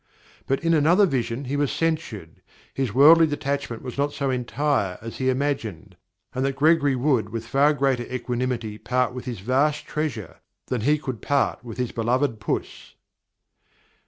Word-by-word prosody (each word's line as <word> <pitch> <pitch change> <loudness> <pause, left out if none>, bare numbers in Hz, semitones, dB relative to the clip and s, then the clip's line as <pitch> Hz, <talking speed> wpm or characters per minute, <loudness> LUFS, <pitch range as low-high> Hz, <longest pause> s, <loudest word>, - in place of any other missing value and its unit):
But 135 +3 0
in 165 0 +3
another 165 +6 +5
vision 130 -4 -2
he 135 +3 -3
was 145 -1 +1
censured; 155 - -3 0.3
his 135 -5 -1
worldly 160 +7 +7
detachment 140 -5 -3
was 130 +1 -6
not 145 +1 +1
so 140 -1 -1
entire 125 -6 -1
as 115 +1 -8
he 130 0 0
imagined, 130 - -2 0.4
and 130 - -1
that 135 0 0
Gregory 145 -1 +3
would 125 -5 +1
with 115 +1 -5
far 140 +5 +3
greater 135 -4 0
equanimity 120 -3 -3
part 125 0 0
with 125 0 -7
his 120 -7 -5
vast 140 +7 +1
treasures 145 - -4 0.3
than 125 -3 -2
he 150 +6 +3
could 130 -6 -6
part 140 -3 0
with 115 -2 -8
his 125 -2 -2
beloved 120 +1 0
puss." 110 - -4
130 Hz, 160 wpm, -24 LUFS, 120-145 Hz, 0.4 s, worldly